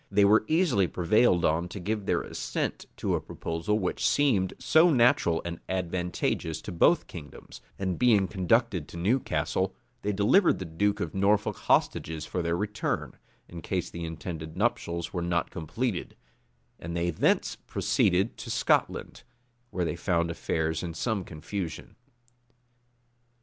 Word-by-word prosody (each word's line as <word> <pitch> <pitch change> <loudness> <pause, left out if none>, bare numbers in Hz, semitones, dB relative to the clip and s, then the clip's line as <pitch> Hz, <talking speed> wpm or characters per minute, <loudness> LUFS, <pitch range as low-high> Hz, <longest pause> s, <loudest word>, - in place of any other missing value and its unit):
They 100 0 +4
were 110 +2 +5
easily 155 - +3
prevailed 90 +2 +3
on 80 +3 +1
to 100 - -7
give 105 +2 -3
their - - +1
assent - - -3
to - - -1
a - - 0
proposal 85 +6 -2
which 95 -4 -2
seemed 110 -11 +2
so 160 +3 +5
natural 120 - +3
and 85 -1 -4
so - - -24
advantageous 90 -3 -2
to - - -6
both 90 - +3
kingdoms; 75 -5 -11 0.2
and 95 -2 -2
being 110 -6 +4
conducted 95 -2 +1
to - - -10
Newcastle, 110 +10 0 0.3
they 105 - -1
delivered 105 - +4
to 95 - -5
the 80 - -11
duke 100 +5 0
of - - -3
Norfolk 100 +2 +2
hostages 80 -1 0
for 90 - -3
their 85 0 0
return, 105 +2 -2 0.3
in 85 -1 -9
case 90 0 -3
the 85 - -6
intended 80 0 -6
nuptials 105 -6 -1
were 90 - -2
not 85 0 -1
completed; 90 - -3 0.6
and 85 +1 -5
they 85 +1 0
thence 80 - +1
proceeded 95 +5 +1
to - - -8
Scotland, - - 0 0.5
where 90 -6 -2
they 85 - -2
found 85 -1 0
affairs 80 -1 -1
in 85 -2 -5
some 110 +2 -1
confusion. 85 +2 -6
90 Hz, 150 wpm, -28 LUFS, 85-105 Hz, 0.6 s, were